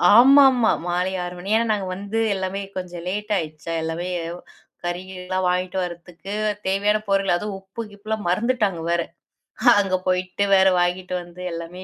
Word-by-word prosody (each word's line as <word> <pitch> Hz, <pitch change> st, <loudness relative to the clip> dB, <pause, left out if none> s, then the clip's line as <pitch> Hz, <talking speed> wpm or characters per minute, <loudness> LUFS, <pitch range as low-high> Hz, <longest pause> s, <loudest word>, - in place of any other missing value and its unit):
ஆமாம்மா 260 Hz, -1 st, +7 dB, 0.2 s
மாலை 180 Hz, +2 st, 0 dB
6 175 Hz, 0 st, -5 dB
மணி. 195 Hz, +4 st, -5 dB
ஏனா, 230 Hz, -, +1 dB
நாங்க 200 Hz, -2 st, -2 dB
வந்து 200 Hz, +3 st, -3 dB, 0.2 s
எல்லாமே 190 Hz, +1 st, -3 dB, 0.2 s
கொஞ்சம் 175 Hz, -2 st, -6 dB
லேட் 210 Hz, +2 st, -4 dB
ஆயிடுச்சா 160 Hz, 0 st, -5 dB
எல்லாமே, 165 Hz, +3 st, -3 dB, 0.8 s
கறி 175 Hz, +1 st, -2 dB
கிறிலாம் 185 Hz, 0 st, -3 dB
வாங்கிட்டு 180 Hz, +1 st, -1 dB
வரத்துக்கு 175 Hz, +2 st, -7 dB, 0.3 s
தேவையான 205 Hz, +2 st, +2 dB
பொருள். 195 Hz, -1 st, +2 dB
அதுவும் 200 Hz, +1 st, -3 dB
உப்பு 195 Hz, +4 st, -8 dB
கிப்புலாம் 215 Hz, +1 st, -5 dB
மறந்துட்டாங்க 210 Hz, -3 st, +1 dB
வேற. 170 Hz, 0 st, +2 dB, 0.8 s
அங்க 190 Hz, -2 st, +1 dB
போயிட்டு 185 Hz, +2 st, 0 dB
வேற 190 Hz, 0 st, +6 dB
வாங்கிட்டு 180 Hz, +1 st, -1 dB
வந்து 175 Hz, +1 st, -12 dB
எல்லாமே 170 Hz, +2 st, -7 dB
185 Hz, 145 wpm, -23 LUFS, 175-205 Hz, 0.8 s, ஆமாம்மா